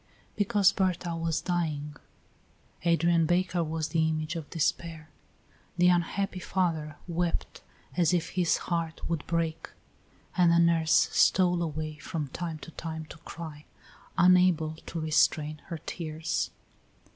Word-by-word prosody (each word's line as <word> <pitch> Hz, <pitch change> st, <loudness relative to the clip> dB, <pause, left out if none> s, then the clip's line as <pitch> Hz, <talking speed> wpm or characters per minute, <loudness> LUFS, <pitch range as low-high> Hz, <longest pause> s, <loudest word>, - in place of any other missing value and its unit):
Because 205 Hz, -1 st, +4 dB
Berta 180 Hz, -3 st, -1 dB
was 165 Hz, -1 st, -1 dB
dying. 155 Hz, -4 st, -2 dB, 0.9 s
Adrian 170 Hz, -1 st, +3 dB
Baker 175 Hz, 0 st, +1 dB
was 160 Hz, 0 st, -2 dB
the 160 Hz, -2 st, +2 dB
image 155 Hz, +1 st, -2 dB
of 160 Hz, -3 st, -6 dB
despair; 160 Hz, -1 st, -2 dB, 0.7 s
the 180 Hz, 0 st, +5 dB
unhappy 185 Hz, +2 st, 0 dB
father 165 Hz, -6 st, -1 dB
wept 175 Hz, 0 st, -2 dB, 0.3 s
as 175 Hz, -2 st, +3 dB
if 170 Hz, -2 st, 0 dB
his 180 Hz, -2 st, +2 dB
heart 165 Hz, -2 st, -2 dB
would 165 Hz, -3 st, -2 dB
break, 165 Hz, -1 st, -1 dB, 0.7 s
and 175 Hz, -2 st, +5 dB
the 170 Hz, -, +5 dB
nurse 165 Hz, -2 st, +4 dB
stole 180 Hz, -2 st, +4 dB
away 155 Hz, -1 st, -3 dB
from 155 Hz, -1 st, -4 dB
time 165 Hz, +2 st, -4 dB
to -, -, -11 dB
time 160 Hz, -1 st, -6 dB
to -, -, -11 dB
cry, 155 Hz, -3 st, -9 dB, 0.5 s
unable 180 Hz, -3 st, +5 dB
to 165 Hz, -, -4 dB
restrain 155 Hz, -1 st, +1 dB
her 170 Hz, -, -4 dB
tears. 160 Hz, 0 st, -3 dB
165 Hz, 130 wpm, -29 LUFS, 155-175 Hz, 0.9 s, the